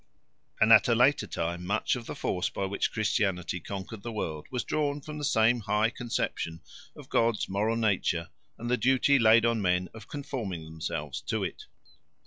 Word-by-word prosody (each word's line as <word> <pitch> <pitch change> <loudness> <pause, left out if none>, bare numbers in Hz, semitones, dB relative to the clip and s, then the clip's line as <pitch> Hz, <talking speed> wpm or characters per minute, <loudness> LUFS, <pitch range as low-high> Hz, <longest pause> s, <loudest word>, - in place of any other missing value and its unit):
And 110 +1 +7
at 110 - +7
a 120 - +3
later 130 +5 +3
time 85 +1 -3
much 100 +4 0
of 120 -2 -7
the - - -5
force 90 - -1
by 100 - -3
which 100 +1 -1
Christianity 95 -5 0
conquered 100 +4 -7
the 120 - -5
world 80 -8 -4
was 125 -2 -2
drawn 145 -1 -1
from 150 +1 -8
the - - -5
same 120 -4 +3
high 105 +1 +1
conception 85 -9 -3 0.3
of - - -12
God's 115 -2 +1
moral 105 +4 0
nature 95 -6 0 0.3
and 115 - -6
the 125 +1 +2
duty 130 +3 +3
laid 115 0 +6
on 115 -2 +1
men 90 -1 +1
of 110 -2 -11
conforming 115 - -5
themselves 75 -2 -5
to - - -1
it. - - -5
110 Hz, 180 wpm, -28 LUFS, 90-120 Hz, 0.3 s, And